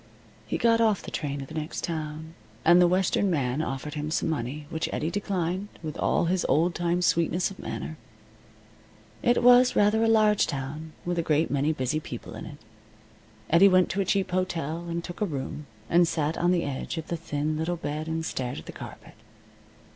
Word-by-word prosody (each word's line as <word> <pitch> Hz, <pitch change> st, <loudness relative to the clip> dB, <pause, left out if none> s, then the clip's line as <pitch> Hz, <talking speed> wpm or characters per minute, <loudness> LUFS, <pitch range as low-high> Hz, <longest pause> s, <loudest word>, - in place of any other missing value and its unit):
He -, -, -1 dB
got 230 Hz, -1 st, +3 dB
off 215 Hz, -4 st, +2 dB
the -, -, -7 dB
train 140 Hz, -2 st, -3 dB
at -, -, -10 dB
the -, -, -11 dB
next 155 Hz, 0 st, -4 dB
town, 160 Hz, -1 st, -4 dB, 0.3 s
and 175 Hz, +2 st, +7 dB
the 175 Hz, -, +6 dB
western 190 Hz, +2 st, +2 dB
man 140 Hz, -4 st, 0 dB
offered 145 Hz, 0 st, -4 dB
him 150 Hz, 0 st, -3 dB
some 160 Hz, -, 0 dB
money, 145 Hz, +1 st, -4 dB
which 160 Hz, -, -2 dB
Eddie 160 Hz, +2 st, -2 dB
declined 190 Hz, -1 st, -2 dB, 0.2 s
with 155 Hz, -2 st, -4 dB
all -, -, +1 dB
his 180 Hz, +1 st, +1 dB
old 165 Hz, +6 st, +3 dB
time 175 Hz, +1 st, 0 dB
sweetness 170 Hz, +2 st, +2 dB
of 195 Hz, -, -12 dB
manner. 155 Hz, -, -5 dB, 1.2 s
It 240 Hz, 0 st, +2 dB
was 250 Hz, +1 st, +7 dB
rather 210 Hz, +2 st, +4 dB
a -, -, +3 dB
large 215 Hz, -2 st, +4 dB
town, 150 Hz, +3 st, -5 dB
with 175 Hz, -1 st, -1 dB
a -, -, +3 dB
great 160 Hz, 0 st, +1 dB
many 145 Hz, +2 st, +2 dB
busy 150 Hz, 0 st, -1 dB
people -, -, -8 dB
in -, -, -7 dB
it. 145 Hz, -, -10 dB, 0.9 s
Eddie 180 Hz, +5 st, +7 dB
went 185 Hz, -1 st, +4 dB
to 195 Hz, +3 st, 0 dB
a -, -, 0 dB
cheap 195 Hz, 0 st, 0 dB
hotel, 170 Hz, -2 st, -2 dB
and 170 Hz, 0 st, -3 dB
took 175 Hz, +4 st, -8 dB
a -, -, +3 dB
room, 145 Hz, -1 st, -5 dB, 0.2 s
and 175 Hz, 0 st, +4 dB
sat 160 Hz, -1 st, -1 dB
on 175 Hz, -, +1 dB
the 175 Hz, -1 st, +2 dB
edge 140 Hz, +4 st, -4 dB
of 160 Hz, -, -5 dB
the 170 Hz, -, -1 dB
thin 155 Hz, -2 st, -2 dB
little 165 Hz, +3 st, -1 dB
bed 155 Hz, 0 st, -4 dB
and 160 Hz, 0 st, -2 dB
stared 125 Hz, -5 st, -3 dB
at 75 Hz, -, -8 dB
the -, -, -7 dB
carpet. -, -, -10 dB
165 Hz, 200 wpm, -27 LUFS, 150-180 Hz, 1.2 s, and